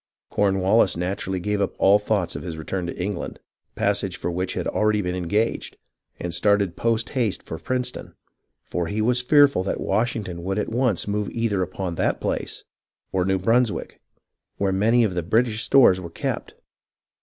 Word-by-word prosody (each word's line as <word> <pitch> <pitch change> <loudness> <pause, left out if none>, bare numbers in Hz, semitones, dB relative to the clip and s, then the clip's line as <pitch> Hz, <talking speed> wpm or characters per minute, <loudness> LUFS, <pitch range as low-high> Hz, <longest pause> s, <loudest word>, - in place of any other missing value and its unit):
Cornwallis 95 0 +3
naturally 95 +1 -2
gave 105 +2 -1
up 100 - -1
all 100 +2 +5
thoughts 105 -4 -1
of - - -5
his 85 -3 -6
return 85 +3 -3
to - - -6
England, 100 +3 -4 0.4
passage 100 -2 0
for 85 - -3
which 90 +2 -2
had - - -2
already 105 0 +1
been 90 -3 -2
engaged, 100 +5 -1 0.4
and 85 -1 -3
started 100 0 +2
post 115 -1 0
haste 115 -7 -1
for 80 - -7
Princeton, 125 -1 -3 0.5
for 85 -2 -2
he 105 +5 -3
was 125 +3 +2
fearful 140 -4 +5
that 95 - -2
Washington 100 -4 -1
would 95 +2 -2
at 105 - -1
once 120 -5 +1
move 105 0 -1
either 115 -4 -1
upon 90 0 -3
that - - 0
place - - -3 0.5
or 95 -1 +1
[New] 95 0 +2
Brunswick, 115 +4 0 0.6
where 100 -1 +1
many 110 +5 +3
of 105 -4 0
the 90 - -1
British 110 +5 +1
stores 120 -10 +5
were 85 - -7
kept. 85 - -4
100 Hz, 170 wpm, -23 LUFS, 90-110 Hz, 0.6 s, all